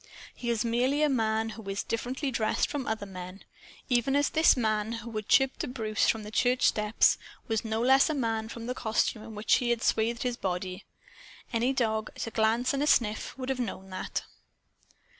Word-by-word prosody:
He 240 - -5
is 230 -1 0
merely 255 +6 +1
a 300 - +4
man 225 -3 +1
who 220 -2 -8
is 195 +1 -2
differently 260 +4 -3
dressed 220 -3 +1
from 285 -3 -4
other 220 -2 -2
men 185 0 -9 0.4
even 250 +1 +2
as 285 0 +3
this 315 -3 +5
man 220 -1 0
who 230 0 -6
had 215 -1 -4
chirped 270 -1 +4
to - - -2
Bruce, 220 -4 0
from 220 -1 0
the 210 - -8
church 245 +2 +2
steps, 210 +1 +3 0.3
was 220 -2 0
no 220 -1 -2
less 265 +4 +5
a 310 - 0
man 225 -4 -1
for 235 - -7
the 245 +2 -3
costume 220 -2 0
in 220 0 -10
which 210 +1 +3
he 245 - -1
had 235 -1 0
swathed 230 +1 +1
his 245 -1 -1
body. 185 0 -3 0.7
Any 235 +3 +2
dog, 220 -4 0
at - - -4
a 225 - -6
glance 225 +4 +2
and 275 - -1
at 295 - +2
a - - +8
sniff, 220 +2 0
would 260 0 -5
have 265 -1 -1
known 190 -5 -5
that. 185 - -4
230 Hz, 210 wpm, -29 LUFS, 215-255 Hz, 0.7 s, a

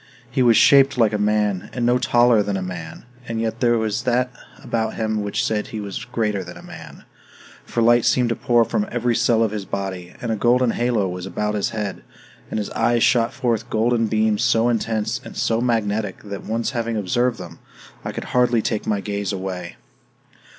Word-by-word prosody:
He - - 0
was 120 -3 +5
shaped 135 -1 +6
like 115 -3 +3
a 105 - 0
man, 105 -2 0
and 120 -2 -1
was 120 - +4
no - - +3
taller 120 -2 +4
than 100 -1 -2
a - - -3
man, 85 +1 -7 0.2
and 115 -1 -3
yet 115 0 -2
there 120 -2 +3
was 110 -2 -1
that 125 0 0 0.3
about 110 -1 -2
him 110 -1 -1
which 105 -1 -1
said 105 -1 -1
that - - -12
he 110 - -5
was 105 +4 -5
greater 105 -5 -1
than - - -10
a - - -13
man, - - -11 0.6
for 115 - -1
light 120 0 +5
seemed 125 -2 +2
to 115 - 0
pour 120 -3 +3
from 205 - -1
every 120 0 0
cell 115 0 +3
of 110 - 0
his 105 -2 -4
body, 95 -2 -5
and 115 - -3
a - - +1
golden 120 +3 +3
halo 120 -5 0
was 90 0 -5
about 105 +2 -2
his 105 -2 0
head, 105 -4 -4 0.5
and - - -3
his 105 - -3
eyes 120 -1 +2
shot 120 -1 +3
forth 120 -3 -1
golden 115 0 +1
beams 110 0 +1
so 120 -1 +3
intense 110 -2 -1
and - - -10
so 115 0 +1
magnetic 110 -3 -1
that, 100 -2 -7
once 115 +1 -1
having 115 -3 -2
observed 120 +5 0
them, 85 -2 -10 0.4
I - - -4
could - - -5
hardly 120 -3 +3
take 110 -3 -2
my 105 -2 0
gaze 100 -1 -3
away. 95 -2 -5
110 Hz, 210 wpm, -21 LUFS, 105-120 Hz, 0.6 s, shaped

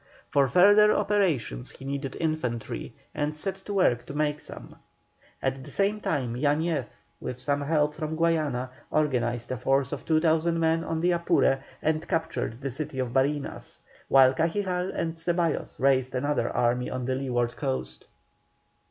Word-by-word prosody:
For 140 -2 +4
further 205 +8 +6
operations 185 - 0
he 135 - -11
needed 140 -1 -4
infantry, 155 -8 -3 0.2
and 150 +1 -2
set 190 +5 -3
to 205 - -4
work 120 -11 +3
to 140 - -7
make 150 0 0
some. - - -11 0.7
At 135 0 -1
the - - -10
same 205 +2 0
time 130 - -1
Yañez, 145 +1 0 0.3
with 125 - -5
some 145 0 -1
help 150 0 +1
from 155 0 -4
Guayana, 155 -6 0 0.2
organized 120 -6 0
a 130 - -2
force 135 +3 +1
of 145 - -5
2,000 160 +1 +2
men 165 0 +2
on 160 -1 -2
the 175 +1 +3
Apure, 170 -5 +2 0.2
and 155 0 0
captured 150 -7 -2
the 135 -1 -3
city 140 +1 -5
of 125 -2 -2
Barinas, 140 +2 -1 0.3
while 135 -1 +6
Cajigal 180 +4 0
and 165 -1 -2
Ceballos 170 -1 -1
raised 130 -1 +2
another 145 +3 0
army 125 +1 +1
on 130 -1 -3
the 130 - 0
leeward 120 -3 -1
coast. 100 - -3
145 Hz, 155 wpm, -27 LUFS, 130-165 Hz, 0.7 s, further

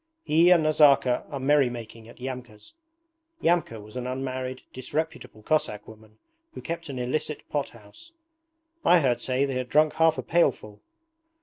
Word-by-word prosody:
'He 165 +3 +4
and 175 -3 +5
Nazarka 145 -5 +4
are 140 -3 -5
merry 140 -1 +3
making 115 -1 -9
at - - -15
Yamka's.' 125 - -8 0.7
(Yamka 165 -9 +1
was 105 +2 -13
an 125 0 -4
unmarried, 130 0 -4
disreputable 145 -4 -5
Cossack 105 -9 -1
woman 110 0 -15 0.4
who - - -7
kept 170 -1 -5
an 135 - -5
illicit 135 +4 -3
pot 145 -2 -2
house.) 110 - -15 0.7
'I 175 0 +6
heard 130 -5 +1
say 130 +2 +1
they 135 - -3
had 125 -1 -3
drunk 155 +1 +3
half 160 -1 +3
a - - -4
pailful.' 130 -11 0
130 Hz, 160 wpm, -26 LUFS, 120-155 Hz, 0.7 s, I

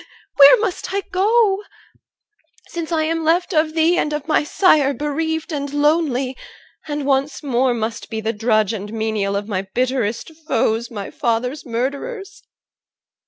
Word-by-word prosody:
Where 280 0 +9
must 420 -5 -3
I 400 - +1
go? 405 +1 +3 1.1
Since 340 -1 -5
I 320 -1 +1
am 325 +1 -1
left 345 +4 +1
of 310 0 +1
thee 330 +2 +3
and 300 - -1
of 300 0 -4
my 310 - +2
sire 295 -3 +3
Bereaved 320 +3 -2
and 285 -2 -3
lonely, 290 -3 +1 0.5
and 295 -2 -3
once 275 +2 0
more 255 -2 +1
must 225 0 -4
be 220 -1 -3
The 220 +1 -2
drudge 215 -1 +1
and 205 -1 -6
menial 220 -3 -1
of 200 +1 -3
my 195 -4 -1
bitterest 250 0 -1 0.2
foes, 225 +1 0
My 205 -4 -6
father's 250 +5 -2
murderers. 350 - -4
285 Hz, 150 wpm, -20 LUFS, 230-320 Hz, 1.1 s, Where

